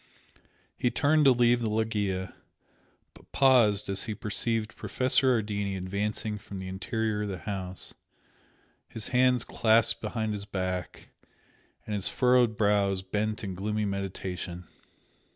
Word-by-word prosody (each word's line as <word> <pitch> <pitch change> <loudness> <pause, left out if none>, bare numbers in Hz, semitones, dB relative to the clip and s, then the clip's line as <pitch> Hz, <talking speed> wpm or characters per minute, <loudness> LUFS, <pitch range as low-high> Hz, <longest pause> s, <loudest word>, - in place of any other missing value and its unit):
He 125 - +1
turned 150 +4 +3
to 135 - +8
leave 120 -1 +3
the 115 - 0
loggia, 105 -4 -1 0.8
but - - -20
paused 120 -7 +4
as 100 0 0
he 110 -2 -4
perceived 110 +1 -2
Professor 130 +4 +2
Ardini 100 -2 -3
advancing 105 +3 -3
from 100 0 -9
the 95 0 -6
interior 105 +3 -2
of 105 - -3
the 95 - -4
house, 95 -1 -5 1.0
his 110 - -3
hands 125 -1 +3
clasped 115 0 +3
behind 110 0 -2
his 100 -1 -5
back 95 -2 -4 0.8
and 105 - -4
his 100 -2 0
furrowed 125 -3 +3
brows 100 -2 +2
bent 105 +3 -2
in 95 -2 -4
gloomy 105 +3 -2
meditation. 95 -3 -5
105 Hz, 135 wpm, -28 LUFS, 95-115 Hz, 1.0 s, to